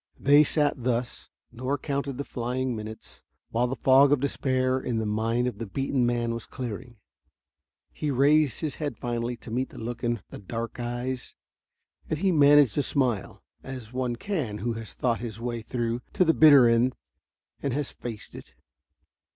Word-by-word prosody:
They 145 Hz, +2 st, +6 dB
sat 145 Hz, -4 st, 0 dB
thus, 120 Hz, -1 st, -2 dB, 0.2 s
nor 130 Hz, +4 st, -2 dB
counted 140 Hz, -2 st, -3 dB
the 140 Hz, -, -2 dB
flying 125 Hz, 0 st, -2 dB
minutes, 110 Hz, 0 st, -9 dB, 0.3 s
while 120 Hz, +2 st, +1 dB
the 130 Hz, -, -3 dB
fog 135 Hz, +2 st, +5 dB
of 145 Hz, -, +4 dB
despair 130 Hz, -1 st, 0 dB
in 125 Hz, -3 st, -2 dB
the 110 Hz, -, -1 dB
mind 115 Hz, +3 st, 0 dB
of 125 Hz, -4 st, -3 dB
the 115 Hz, -, -4 dB
beaten 135 Hz, +3 st, 0 dB
man 120 Hz, -1 st, 0 dB
was 115 Hz, -1 st, -6 dB
clearing. 120 Hz, -1 st, -6 dB, 1.0 s
He 150 Hz, -, -3 dB
raised 140 Hz, 0 st, +3 dB
his 155 Hz, -3 st, -3 dB
head 145 Hz, -7 st, -3 dB
finally 120 Hz, 0 st, -3 dB
to 115 Hz, -, -11 dB
meet 130 Hz, +3 st, -1 dB
the -, -, -13 dB
look 115 Hz, +1 st, -6 dB
in 120 Hz, -1 st, -1 dB
the -, -, -8 dB
dark 115 Hz, +4 st, -5 dB
eyes. 120 Hz, +1 st, -4 dB, 0.7 s
And 155 Hz, -, 0 dB
he 190 Hz, +4 st, +2 dB
managed 145 Hz, -, +5 dB
a -, -, +4 dB
smile, 125 Hz, -8 st, -1 dB, 0.2 s
as 125 Hz, -3 st, -8 dB
one 125 Hz, -1 st, -1 dB
can 130 Hz, -, -3 dB
who 115 Hz, +3 st, -2 dB
has 115 Hz, -1 st, -7 dB
thought 120 Hz, -3 st, 0 dB
his 115 Hz, -2 st, -6 dB
way 120 Hz, -1 st, -3 dB
through 120 Hz, +1 st, -2 dB
to 185 Hz, -, +3 dB
the 165 Hz, -, +4 dB
bitter 145 Hz, -6 st, +8 dB
end 115 Hz, +2 st, +3 dB, 0.7 s
and 140 Hz, -, -1 dB
has 145 Hz, 0 st, -2 dB
faced 115 Hz, -4 st, -8 dB
it. -, -, -12 dB
125 Hz, 175 wpm, -27 LUFS, 115-140 Hz, 1.0 s, bitter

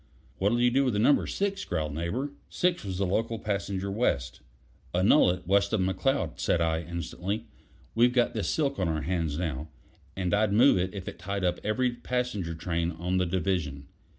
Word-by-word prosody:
"What'll 105 Hz, +5 st, +2 dB
you 120 Hz, 0 st, +4 dB
do 135 Hz, +2 st, +3 dB
with 125 Hz, -5 st, +1 dB
Number 120 Hz, +7 st, +4 dB
Six?" 200 Hz, 0 st, -1 dB
growled 75 Hz, -4 st, -2 dB
Neighbor. 100 Hz, -, -2 dB, 0.2 s
Six 180 Hz, -4 st, 0 dB
was 95 Hz, -3 st, -4 dB
the 100 Hz, -, +1 dB
local 115 Hz, +5 st, 0 dB
passenger 100 Hz, -2 st, -2 dB
west. 65 Hz, -, -1 dB, 0.5 s
"Annul 95 Hz, +7 st, +5 dB
it 90 Hz, 0 st, -2 dB
west 100 Hz, +3 st, +2 dB
of 110 Hz, -, +2 dB
McCloud," 95 Hz, -, 0 dB
said 85 Hz, -, +1 dB
I 80 Hz, -1 st, +1 dB
instantly. 85 Hz, +5 st, -4 dB, 0.5 s
"We've 120 Hz, +2 st, +4 dB
got 120 Hz, -1 st, +2 dB
this 110 Hz, -4 st, -1 dB
silk 140 Hz, -3 st, 0 dB
on 95 Hz, -, +1 dB
our 80 Hz, -2 st, -1 dB
hands 80 Hz, -3 st, -1 dB
now, 80 Hz, -3 st, -3 dB, 0.5 s
and 90 Hz, -2 st, -1 dB
I'd 105 Hz, 0 st, +2 dB
move 120 Hz, -2 st, +6 dB
it 95 Hz, +3 st, -2 dB
if 95 Hz, -2 st, -6 dB
it -, -, -7 dB
tied 100 Hz, +2 st, -3 dB
up 90 Hz, -1 st, +1 dB
every 125 Hz, +4 st, +1 dB
passenger 120 Hz, -8 st, -2 dB
train 85 Hz, 0 st, -1 dB
on 90 Hz, +3 st, -2 dB
the 90 Hz, -1 st, +1 dB
division. 80 Hz, -6 st, -2 dB
95 Hz, 185 wpm, -28 LUFS, 85-115 Hz, 0.5 s, move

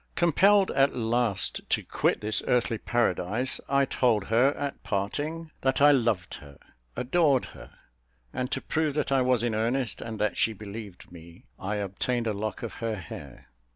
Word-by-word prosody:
Compelled 190 Hz, +4 st, +4 dB
at 135 Hz, +1 st, +2 dB
last 115 Hz, -3 st, 0 dB
to -, -, +1 dB
quit -, -, 0 dB
this 110 Hz, +1 st, 0 dB
earthly 115 Hz, -2 st, +1 dB
paradise, 120 Hz, +1 st, 0 dB
I 140 Hz, 0 st, +3 dB
told 115 Hz, -6 st, +1 dB
her, 120 Hz, +5 st, +4 dB
at 140 Hz, -1 st, -4 dB
parting, 150 Hz, +11 st, -3 dB
that 130 Hz, 0 st, +1 dB
I 145 Hz, +1 st, +7 dB
loved 115 Hz, -10 st, +1 dB
her, 70 Hz, -2 st, -14 dB, 0.4 s
adored 140 Hz, 0 st, +2 dB
her; -, -, -13 dB, 0.6 s
and 125 Hz, 0 st, -2 dB
to -, -, -2 dB
prove 155 Hz, -2 st, -1 dB
that 150 Hz, -, -1 dB
I 135 Hz, -1 st, +4 dB
was 125 Hz, -2 st, +2 dB
in 120 Hz, -2 st, 0 dB
earnest, 115 Hz, +3 st, 0 dB
and 115 Hz, -1 st, -6 dB
that 105 Hz, 0 st, -1 dB
she 115 Hz, -, +2 dB
believed 105 Hz, -3 st, -9 dB
me, 85 Hz, -1 st, -14 dB
I 100 Hz, +3 st, -3 dB
obtained 105 Hz, +4 st, -2 dB
a 110 Hz, -, 0 dB
lock 105 Hz, +3 st, -4 dB
of 115 Hz, -, -5 dB
her 115 Hz, -1 st, -1 dB
hair. 75 Hz, -7 st, -10 dB
115 Hz, 170 wpm, -27 LUFS, 105-135 Hz, 0.6 s, I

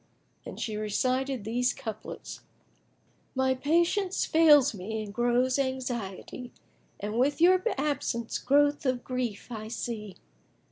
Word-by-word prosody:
And -, -, -8 dB
she 215 Hz, -2 st, -3 dB
recited 255 Hz, +4 st, -1 dB
these 245 Hz, +4 st, 0 dB
couplets, 220 Hz, -5 st, -7 dB, 1.0 s
"My 260 Hz, 0 st, +2 dB
patience 340 Hz, +8 st, +1 dB
fails 295 Hz, -5 st, +6 dB
me 215 Hz, +3 st, -4 dB
and 205 Hz, -1 st, -8 dB
grows 245 Hz, +3 st, +2 dB
anxiety; 250 Hz, -3 st, -4 dB, 0.2 s
* -, -, -37 dB
And 210 Hz, +3 st, -2 dB
with 280 Hz, +4 st, +2 dB
your 365 Hz, +2 st, +6 dB, 0.2 s
absence 265 Hz, -5 st, -1 dB
growth 290 Hz, +2 st, +3 dB
of 255 Hz, -1 st, 0 dB
grief 250 Hz, -5 st, -3 dB
I 215 Hz, -2 st, -5 dB
see. 220 Hz, -3 st, -5 dB
250 Hz, 125 wpm, -28 LUFS, 220-280 Hz, 1.0 s, fails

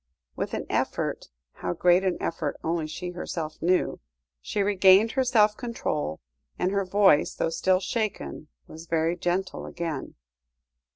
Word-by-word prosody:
With -, -, -3 dB
an -, -, -4 dB
effort -, -, -1 dB, 0.2 s
how 90 Hz, -, -4 dB
great 180 Hz, -, +4 dB
an 185 Hz, -2 st, 0 dB
effort 155 Hz, -3 st, -2 dB
only 165 Hz, -1 st, -1 dB
she 175 Hz, +3 st, -5 dB
herself 165 Hz, -3 st, -5 dB
knew 180 Hz, +2 st, +1 dB, 0.4 s
she 200 Hz, -, -1 dB
regained 195 Hz, +2 st, +5 dB
her 265 Hz, -, +1 dB
self 215 Hz, -4 st, +4 dB
control, 180 Hz, -, -3 dB, 0.4 s
and 180 Hz, -, 0 dB
her 200 Hz, -1 st, 0 dB
voice, 190 Hz, -5 st, +4 dB
though 165 Hz, -, -1 dB
still 185 Hz, +2 st, +2 dB
shaken, 195 Hz, -, -3 dB, 0.2 s
was 160 Hz, +1 st, -11 dB
very 165 Hz, +1 st, +1 dB
gentle 180 Hz, +2 st, -2 dB
again. 165 Hz, -5 st, -5 dB
180 Hz, 140 wpm, -26 LUFS, 165-200 Hz, 0.4 s, regained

